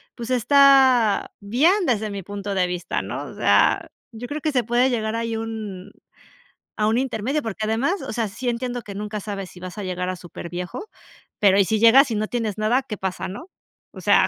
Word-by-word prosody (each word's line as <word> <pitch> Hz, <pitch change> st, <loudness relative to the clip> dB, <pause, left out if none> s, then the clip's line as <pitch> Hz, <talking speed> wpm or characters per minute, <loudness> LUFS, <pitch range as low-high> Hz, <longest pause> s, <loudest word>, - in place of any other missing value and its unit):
pues 235 Hz, -1 st, -7 dB
está 260 Hz, -3 st, +5 dB
bien 315 Hz, -, +2 dB
desde 220 Hz, -4 st, 0 dB
mi 200 Hz, -2 st, -6 dB
punto 200 Hz, +1 st, -5 dB
de 185 Hz, -2 st, +1 dB
vista, 180 Hz, -1 st, -3 dB
¿no?, -, -, -5 dB
o -, -, -10 dB
sea, -, -, +3 dB, 0.2 s
yo 235 Hz, +2 st, -7 dB
creo 295 Hz, +3 st, -5 dB
que 310 Hz, -, 0 dB
se 250 Hz, -5 st, +1 dB
puede 245 Hz, +3 st, +3 dB
llegar 220 Hz, -3 st, -1 dB
ahí 230 Hz, 0 st, -2 dB
a -, -, -2 dB
un 215 Hz, -5 st, -6 dB, 0.9 s
a 210 Hz, 0 st, +1 dB
un 225 Hz, +2 st, +2 dB
intermedio, 260 Hz, +3 st, -1 dB
porque 220 Hz, -1 st, -3 dB
además, 265 Hz, -, 0 dB
o -, -, -6 dB
sea, 225 Hz, 0 st, -1 dB
sí 240 Hz, +5 st, -4 dB
entiendo 245 Hz, +1 st, -3 dB
que 200 Hz, -3 st, -9 dB
nunca 210 Hz, +1 st, -4 dB
sabes 195 Hz, -3 st, -6 dB
si 180 Hz, -, -13 dB
vas 185 Hz, +2 st, -8 dB
a 205 Hz, -, -4 dB
llegar 180 Hz, 0 st, -3 dB
a 185 Hz, -, -2 dB
superviejo, 175 Hz, -, -7 dB, 0.5 s
pero 200 Hz, -1 st, +5 dB
y 195 Hz, -, +5 dB
si 215 Hz, +4 st, 0 dB
llegas 245 Hz, +5 st, +7 dB
y -, -, 0 dB
no 215 Hz, +1 st, -1 dB
tienes 220 Hz, -4 st, -3 dB
nada, 220 Hz, +5 st, +2 dB
¿qué 210 Hz, -6 st, -6 dB
pasa, 185 Hz, -1 st, -3 dB
no?, 310 Hz, -, -9 dB, 0.4 s
o -, -, -11 dB
sea. -, -, +4 dB
220 Hz, 215 wpm, -23 LUFS, 200-245 Hz, 0.9 s, llegas